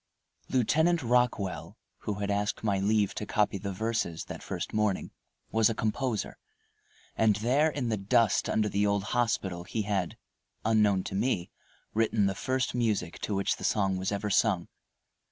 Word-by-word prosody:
Lieutenant 160 +6 +2
Rockwell, 120 -5 0 0.2
who 105 - -3
had 100 0 -2
asked 105 +1 -1
my 100 -3 +1
leave 105 0 +2
to 105 - -5
copy 105 -2 +1
the 100 +1 -4
verses 110 -4 -2
that - - -7
first - - -5
morning, 105 -3 0 0.4
was 110 0 +4
a 115 - -2
composer, 110 0 -2 0.8
and 110 -2 +3
there 130 +9 +2
in 140 -5 -2
the 110 - 0
dust 115 +3 +2
under 110 -1 +2
the 105 0 +1
old 100 -1 +1
hospital 100 -7 0
he 110 +4 -3
had, 100 -4 -2 0.5
unknown 105 -4 +3
to - - -6
me, 95 -3 0 0.4
written 110 -1 +2
the 100 - +1
first 130 +6 -1
music 110 -8 -1
to 105 - -2
which 100 0 0
the - - -9
song 95 -3 +1
was 95 +2 -2
ever 100 +1 -2
sung. 95 -3 +2
105 Hz, 165 wpm, -29 LUFS, 100-115 Hz, 0.8 s, was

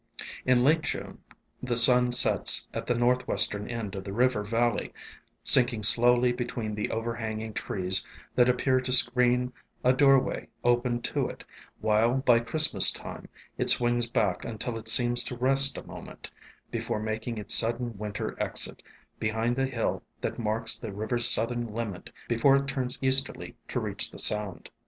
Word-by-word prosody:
In 125 -1 +2
late 155 +4 +2
June - - -7 0.4
the 125 -1 -4
sun 125 +1 +5
sets 120 - +4
at - - -7
the 120 - -1
northwestern 120 -4 0
end 115 -5 -6
of 95 - -7
the 100 - -9
river 120 0 -1
valley, 115 +2 -2 0.5
sinking 120 -3 +3
slowly 120 +3 +5
between 120 -3 -6
the 105 0 -4
overhanging 110 -1 -6
trees 95 -1 -2 0.3
that 125 0 +2
appear 130 +1 0
to 125 - -5
screen 125 0 +4 0.3
a 125 - +3
doorway 135 0 +1 0.2
opened 120 0 -1
to - - -2
it, - - -12 0.4
while 110 +3 0
by 125 -3 +2
Christmas 155 +6 +6
time - - -8 0.3
it - - +1
swings 120 -1 +2
back 100 -6 -2
until 115 +1 -6
it 115 0 -9
seems 120 +1 +4
to 125 - -7
rest 135 +2 +4
a - - -10
moment, - - -12 0.4
be - - -4
fore - - -4
making 110 +2 -6
its 105 - +1
sudden 120 0 +2
winter 105 -1 -6
exit, - - -4 0.4
behind 115 +3 -3
a 135 - -1
hill 125 -4 -4 0.2
that - - -5
marks 115 +1 0
the 110 - -8
river's 115 +4 0
southern 115 -1 +1
limit 110 -6 -7 0.2
before 120 +4 +2
it 140 0 -1
turns 130 -2 -2
easterly 130 0 -1
to - - -4
reach - - -3
the - - -14
sound. 105 -3 -2
120 Hz, 160 wpm, -26 LUFS, 110-125 Hz, 0.5 s, Christmas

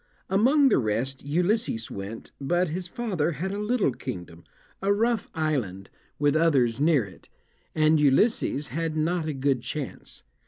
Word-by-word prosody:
Among 265 +8 +5
the 210 - +3
rest 125 +4 -2
Ulysses 175 - 0
went, 100 +3 -7
but 175 +5 +1
his 180 +3 -4
father 175 -7 -1
had 185 +7 -3
a 200 - -3
little 210 - +1
kingdom, 85 -7 -8 0.4
a 195 +1 +2
rough 225 +2 +1
island, 125 - -2 0.3
with 145 0 +2
others 135 -8 +3
near 150 -6 +3
it, 95 -2 -16 0.5
and 155 0 +4
Ulysses 145 - +2
had 160 +2 -2
not 165 +1 0
a 155 - -1
good 135 -2 0
chance. 145 +2 -6
155 Hz, 150 wpm, -26 LUFS, 130-185 Hz, 0.5 s, Among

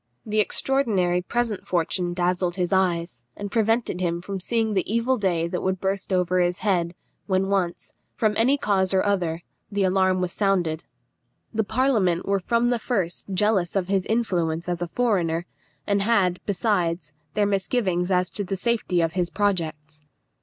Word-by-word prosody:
The 215 0 0
extraordinary 205 -7 +1
present 230 0 -2
fortune 175 0 0
dazzled 180 0 0
his 180 0 -1
eyes, 170 -8 0 0.2
and 205 -1 -5
prevented 225 -4 +1
him 170 -1 0
from 195 +2 -5
seeing 220 +3 0
the 190 0 -1
evil 235 +3 +2
day 180 -7 0
that 180 +1 -3
would 190 0 -1
burst 195 +1 -2
over 180 0 +2
his 175 0 +1
head, 175 -4 +1 0.3
when 190 0 +1
once, 185 -3 -1 0.2
from 215 -2 +1
any 255 +6 +3
cause 190 -6 +1
or 190 - +2
other, 175 -5 0 0.3
the 200 -1 0
alarm 185 0 +2
was 180 -1 -1
sounded. 180 -6 0 0.7
The 220 0 +1
parliament 215 -7 +1
were 200 0 +2
from 235 +5 +1
the 240 - +1
first 195 -9 -2
jealous 195 -2 +1
of 190 -2 0
his 195 -2 +1
influence 175 -8 0
as 175 -1 -2
a 175 - -1
foreigner, 175 -7 0 0.4
and 200 -1 +1
had, 195 -5 +2
besides, 175 -6 0 0.2
their 210 - +3
misgivings 195 -3 0
as 180 -1 +1
to 205 - -2
the 195 0 -3
safety 200 -4 0
of 165 0 0
his 180 -2 0
projects. 160 -7 -2
190 Hz, 165 wpm, -24 LUFS, 175-210 Hz, 0.7 s, any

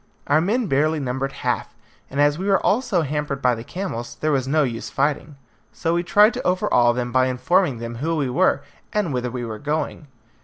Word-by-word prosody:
Our 150 +2 +3
men 225 +8 +1
barely 155 0 +1
numbered 135 0 -2
half, - - -1 0.3
and 140 - -4
as 145 +2 +3
we 190 - -3
were 195 -1 +4
also 210 -6 +2
hampered 150 -1 -2
by 125 -2 +3
the 115 -1 -5
camels, 175 -8 -5
there 155 - 0
was 135 -2 0
no 155 +2 +3
use 120 -4 -3
in - - -22
fighting, 145 +1 0 0.4
so 165 0 -1
we 170 - +1
tried 210 +6 +5
to 245 - -4
overawe 125 -10 +3
them 120 0 -3
by 130 0 +3
informing 130 +3 +1
them 115 0 -6
who 160 +6 -1
we 145 -4 0
were, 160 +10 +2 0.3
and 205 -9 0
whither 125 -1 -1
we 120 0 -4
were 110 -2 -6
going. 150 0 -3
145 Hz, 215 wpm, -22 LUFS, 125-175 Hz, 0.4 s, tried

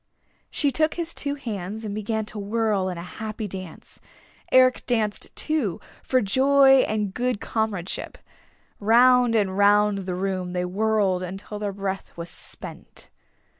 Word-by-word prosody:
She 285 -2 +1
took 310 +4 +1
his 340 -1 -3
two 285 0 -2
hands 215 -4 -5
and 205 - -4
began 215 +1 -2
to 210 0 -6
whirl 205 -2 0
in 180 - -5
a 170 - -6
happy 215 +3 -6
dance. 185 -4 -9 0.5
Eric 255 -1 +5
danced, 220 -4 0
too, 285 - -1 0.2
for 255 -1 +1
joy 270 +5 +5
and 210 -3 -1
good 250 -2 -1
comradeship. 210 -5 -3 0.6
Round 245 +2 +5
and 195 -3 +1
round 205 0 +4
the 185 -2 -4
room 185 -1 -2
they 180 0 -1
whirled 200 -1 +1
until 195 +3 -6
their 205 -1 -2
breath 195 -2 -5
was 170 0 -6
spent. - - -8
210 Hz, 145 wpm, -24 LUFS, 195-240 Hz, 0.6 s, Eric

